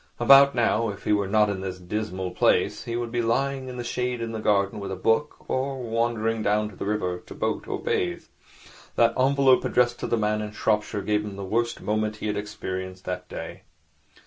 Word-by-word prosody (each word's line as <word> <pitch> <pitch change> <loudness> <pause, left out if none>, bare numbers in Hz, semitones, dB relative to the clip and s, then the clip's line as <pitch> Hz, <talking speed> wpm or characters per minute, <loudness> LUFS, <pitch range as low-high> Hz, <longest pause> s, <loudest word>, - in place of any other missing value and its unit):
About 140 0 +7
now, 115 -1 +2
if 100 - -7
he - - +2
were 100 -1 +1
not 105 +1 +4
in 100 -2 -3
this 95 -1 -4
dismal 95 0 -4
place, - - +2
he 115 - -3
would 120 -1 -3
be 120 0 0
lying 135 +3 0
in 125 -1 -7
the 120 - -4
shade 125 0 -2
in 115 -1 -3
the 110 - -4
garden 100 -1 +1
with 100 - -5
a - - -2
book, 115 +10 0
or 135 +1 -1
wandering 115 -1 -1
down 105 0 +1
to 100 - -14
the 100 - -5
river 90 -4 -1
to - - -12
boat - - -2
or - - -2
bathe. 90 -1 -1 0.7
That 115 0 +4
envelope 135 0 +4
addressed 120 -1 +2
to - - -3
the 115 - +1
man 105 0 0
in 105 0 -5
Shropshire 105 -1 0
gave 105 0 +1
him 105 -2 -6
the 100 - -6
worst 115 +4 -1
moment 110 0 -1
he 105 - -7
had 105 -1 -1
experienced 95 -2 -5
that 90 - -5
day. - - -7
110 Hz, 215 wpm, -25 LUFS, 100-120 Hz, 0.7 s, About